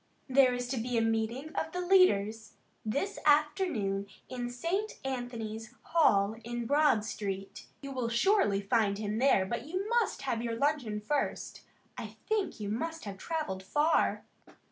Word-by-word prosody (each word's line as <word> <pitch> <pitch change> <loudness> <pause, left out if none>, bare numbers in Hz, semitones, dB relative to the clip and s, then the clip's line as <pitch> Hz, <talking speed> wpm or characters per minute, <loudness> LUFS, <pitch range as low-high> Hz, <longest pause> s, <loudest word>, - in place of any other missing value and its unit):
"There 260 -2 +5
is 245 0 -3
to 260 - -1
be 240 +1 -1
a - - +3
meeting 225 +7 -1
of 320 - -3
the 360 - -2
leaders 225 - +3 0.3
this 285 - -2
afternoon 295 - +2 0.2
in 245 -1 -4
St. 350 - -2
Anthony's 235 -3 -5
Hall 215 -11 +3
in 240 0 -4
Broad 285 -5 +3
street. 195 -3 -5
You 275 -1 -6
will 250 -3 -2
surely 235 - +3
find 205 -1 +1
him 210 +1 -2
there, 255 -8 +4
but 235 +6 -4
you 370 +5 -2
must 470 -9 +1
have 240 -4 -1
your 230 -1 -2
luncheon 250 -6 0
first. 285 +6 -2 0.4
I - - -7
think 430 - -1
you 210 - -4
must 325 +8 -3
have 195 -2 -7
travelled 305 - -3
far." 295 +11 +2
245 Hz, 155 wpm, -31 LUFS, 215-305 Hz, 0.4 s, There